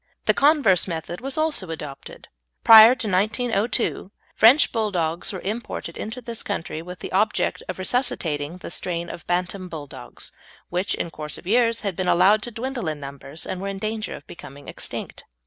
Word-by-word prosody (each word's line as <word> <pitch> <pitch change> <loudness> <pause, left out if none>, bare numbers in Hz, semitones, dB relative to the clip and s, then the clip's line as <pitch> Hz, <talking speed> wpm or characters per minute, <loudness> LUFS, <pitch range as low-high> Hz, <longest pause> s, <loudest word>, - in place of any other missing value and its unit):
The - - +5
converse 280 - +4
method 170 +2 -5
was 270 +2 -4
also 310 - +1
adopted. 150 -4 -8 0.4
Prior 225 +2 +10
to 230 - 0
1902 215 +1 0 0.2
French 260 +7 +6
Bulldogs 180 -7 -1
were 190 - -6
imported 220 +5 -4
into 220 +4 -6
this 230 -1 -5
country 165 -5 -4
with 180 +2 -9
the - - -6
object 210 +3 +1
of - - -3
resuscitating 180 - -1
the 180 - -8
strain 170 -1 -3
of - - -10
bantam 180 +1 -1
Bulldogs, 150 -4 -8 0.4
which 180 +3 -1
in 170 - -4
course 150 -1 -6
of - - -13
years 230 +3 +2
had 200 -4 -2
been 185 0 -2
allowed 205 +5 +5
to 240 - -3
dwindle 240 -2 -4
in 155 -1 -2
numbers, 140 +2 -8
and 185 - -4
were 195 - -3
in 195 0 -4
danger 215 +2 -3
of - - -12
becoming 140 -3 -12
extinct. - - -5
195 Hz, 175 wpm, -23 LUFS, 170-230 Hz, 0.4 s, Prior